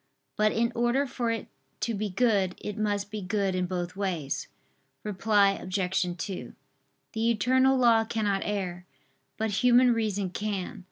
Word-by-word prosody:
But 215 0 +3
in 235 +1 +1
order 240 +4 +1
for 245 -3 -2
it 230 -1 -2 0.3
to 235 - 0
be 210 0 -2
good, 195 -3 +1
it 210 - -5
must 205 -2 -1
be 215 -1 -4
good 195 0 0
in 180 0 -1
both 180 0 -3
ways. 180 -8 -2 0.6
Reply 205 0 +3
Obj. 185 -2 -1
2: 190 +2 -6 0.6
The 225 +1 +1
eternal 260 +4 +3
law 230 -3 +4
cannot 210 -3 0
err, 180 -3 -3 0.5
but 220 -1 -1
human 250 0 +6
reason 205 -4 -1
can. 200 -1 -3
210 Hz, 150 wpm, -28 LUFS, 190-230 Hz, 0.6 s, human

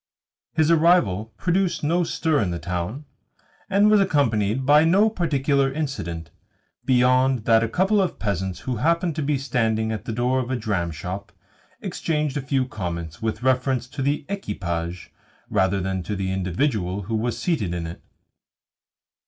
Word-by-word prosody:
His 160 +1 +3
arrival 160 - +4
produced 180 0 0
no 170 +4 +2
stir 160 -2 0
in 100 - 0
the 85 - -2
town, 90 - -4 0.6
and 200 +1 +4
was 210 -1 +5
accompanied 125 - +1
by 150 +2 +6
no 195 +7 +4
particular 140 -7 +1
incident, 110 - -4 0.5
beyond 130 -1 +3
that 115 -1 +5
a 115 - 0
couple 195 - +2
of 185 - -1
peasants 95 -3 -2
who 125 -3 -3
happened 170 - +1
to - - 0
be 145 0 +1
standing 115 -4 0
at 110 -4 -4
the - - -3
door 125 +3 +1
of 125 -1 -3
a 130 - 0
dramshop 95 -2 -3 0.5
exchanged 155 -6 -1
a 145 - -1
few 135 -1 0
comments 85 -8 -5
with 110 +1 -2
reference 130 -1 +1
to 140 +1 -6
the 145 +2 0
equipage 90 - -4 0.4
rather 95 -1 +2
than 95 0 -2
to 105 +4 -4
the 95 -1 -2
individual 95 - -1
who 110 +5 -5
was 115 +1 -1
seated 120 - -1
in 85 -1 -3
it. 80 +1 -8
125 Hz, 160 wpm, -23 LUFS, 95-150 Hz, 0.6 s, by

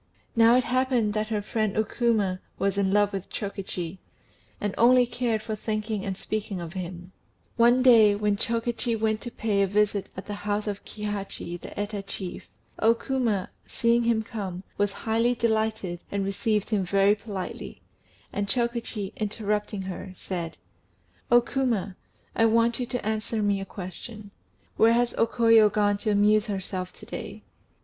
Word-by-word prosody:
Now 230 +1 +6
it 255 - +4
happened 250 -4 +1
that 215 0 -1
her 210 -2 -2
friend 215 -1 -1
O 220 - +4
Kuma 215 -5 0 0.2
was 195 -1 0
in 195 -1 +1
love 205 0 +3
with 195 -1 -5
Chokichi, 190 -3 -5 0.6
and 205 -1 -2
only 250 +1 +6
cared 235 -3 -1
for 220 -1 -3
thinking 215 -1 -3
and 190 -2 -3
speaking 205 -3 -3
of 170 -1 -6
him; 180 -1 -6 0.4
one 240 +2 +5
day, 225 -5 +7
when 205 0 +1
Chokichi 230 +2 0
went 220 0 0
to 240 - -4
pay 210 -3 0
a 195 - +3
visit 205 0 +1
at 190 - -6
the 205 - -5
house 205 0 -2
of 205 -2 -4
Kihachi 200 -4 -5
the - - -8
Eta 205 0 -2
chief, 195 -2 -7 0.3
O 225 +1 +5
Kuma, 230 -7 -1 0.2
seeing 235 0 +2
him 230 -2 +2
come, 195 -5 -5
was 205 0 +1
highly 230 +4 +1
delighted, 220 -6 0
and 200 -1 -1
received 210 +2 -1
him 205 -3 +2
very 195 +2 +4
politely; 205 -3 -6 0.5
and 205 0 -1
Chokichi, 235 -3 -1
interrupting 210 -1 -2
her, 185 0 -6
said 170 -3 -5 0.7
"O 240 0 +7
Kuma, 235 -7 -1 0.4
I 225 - +4
want 230 +2 +2
you 245 - -2
to 245 -3 -3
answer 220 0 -1
me 200 -1 +1
a - - -4
question: 200 +3 -7 0.5
where 225 +1 +6
has 240 0 +2
O 230 - +4
Koyo 225 -2 +5
gone 205 -1 +2
to 215 - -1
amuse 210 +1 +4
herself 190 -2 -4
to - - -12
day?" - - -7
210 Hz, 165 wpm, -26 LUFS, 195-230 Hz, 0.7 s, day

